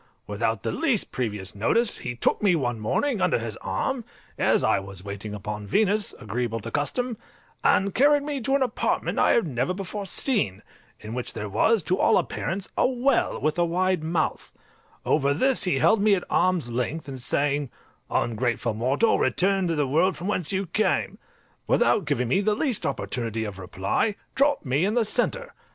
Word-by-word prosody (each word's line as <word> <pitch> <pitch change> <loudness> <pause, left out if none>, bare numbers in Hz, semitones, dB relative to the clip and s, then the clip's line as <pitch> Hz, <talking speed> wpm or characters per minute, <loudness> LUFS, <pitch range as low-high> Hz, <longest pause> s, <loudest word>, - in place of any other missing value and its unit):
Without 110 +2 -2
the - - -1
least 270 - 0
previous 105 -6 -3
notice 210 - +1
he 120 0 -5
took 120 - 0
me 195 -4 +4
one 120 -7 -1
morning 215 - 0
under 185 - +3
his 115 -3 -5
arm, 235 - -2 0.3
as - - +2
I - - +3
was 95 -1 -8
waiting 100 +1 -6
upon 105 0 -6
Venus, 210 - +2
agreeable 115 +1 -3
to - - -6
custom, 225 - -1 0.5
and 195 0 +3
carried 290 +2 +4
me 285 -2 -3
to 270 +4 +1
an 275 - +3
apartment 255 - -1
I - - +4
had 235 - +3
never 135 +4 -1
before 195 +1 -5
seen, 190 - 0 0.4
in 110 +1 -7
which 125 0 -4
there 105 -2 -4
was, 220 - +2
to 185 +4 0
all 225 - +4
appearance, 190 +2 -2
a - - +3
well 260 +2 +1
with 155 +3 0
a - - +4
wide 180 0 0
mouth: 165 +1 -1 0.5
over 140 -1 +2
this 260 - +2
he 180 -7 +1
held 200 - +4
me 210 -1 +5
at 180 - -3
arm's 180 -6 +2
length, 125 +7 -3
and 135 -2 -6
saying, 145 +1 0 0.4
"Ungrateful 120 0 0
mortal, 130 - +2
return 190 0 +2
to 165 - 0
the 145 -2 +1
world 165 +8 +2
from 175 - -7
whence 185 -5 -1
you 195 0 -1
came," 205 +5 0 0.5
without 210 - +3
giving 125 -4 0
me 190 +11 +2
the 210 +1 +1
least 255 -3 0
opportunity 115 -3 -3
of 100 -3 -6
reply, 95 - -1 0.2
dropped 285 - +2
me 135 +5 +1
in 205 +4 +1
the 235 -2 +3
centre. - - -1
165 Hz, 185 wpm, -25 LUFS, -, 0.5 s, me